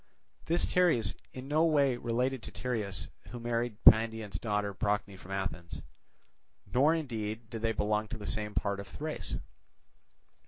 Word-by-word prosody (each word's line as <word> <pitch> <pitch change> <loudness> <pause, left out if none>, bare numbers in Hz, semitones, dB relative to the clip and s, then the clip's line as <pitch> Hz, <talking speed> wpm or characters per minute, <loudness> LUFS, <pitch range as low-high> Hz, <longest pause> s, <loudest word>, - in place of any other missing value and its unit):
This 170 +2 +2
Teres 160 - +4
is - - -12 0.2
in 130 +1 -8
no 155 +3 +3
way 145 -5 +4
related 125 +2 -1
to - - -7
Tereus 110 -6 -2 0.2
who 120 - -7
married 120 -1 -1
Pandion's 110 -4 +5
daughter 105 -2 -1
Procne 100 0 -1
from 95 0 -14
Athens; 95 -4 -4 0.9
nor 145 +6 +5
indeed 115 -6 -4
did 115 -2 -5
they 115 0 +1
belong 105 0 0
to 115 - -6
the 105 - -8
same 105 -1 -1
part 100 -1 0
of 100 - -7
Thrace. 155 - -4
115 Hz, 155 wpm, -31 LUFS, 105-125 Hz, 0.9 s, Pandion's